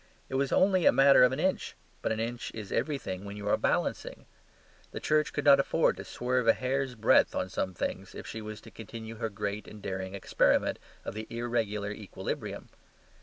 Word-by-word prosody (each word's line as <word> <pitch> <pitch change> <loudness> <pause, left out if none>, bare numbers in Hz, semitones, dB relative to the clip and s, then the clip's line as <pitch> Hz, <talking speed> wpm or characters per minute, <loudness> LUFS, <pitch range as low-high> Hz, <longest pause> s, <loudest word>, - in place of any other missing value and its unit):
It - - -8
was 135 0 +1
only 185 -2 +4
a - - +8
matter 135 -1 +7
of 125 - +6
an 130 - -2
inch; 185 +3 0 0.3
but - - -1
an 110 - -1
inch 120 +1 -3
is 105 -3 -7
everything 115 -11 -2
when 100 0 -7
you 105 0 -6
are - - +4
balancing. - - -1 0.7
The - - -4
Church 155 0 +2
could - - -3
not 140 -1 +8
afford 160 +4 +2
to - - -6
swerve 125 -1 -1
a 115 - +8
hair's 130 0 -1
breadth 110 - +4
on 95 - -1
some 95 0 -2
things 95 +2 -4
if - - -7
she 110 - -6
was 110 0 -7
to 115 - -13
continue 115 0 -8
her 115 0 -2
great 105 0 -4
and 105 - -10
daring 95 -1 -4
experiment 100 - +2 0.3
of - - -4
the 110 +1 -6
irregular 115 -4 -2
equilibrium. 105 -1 -5
115 Hz, 200 wpm, -30 LUFS, 105-130 Hz, 0.7 s, a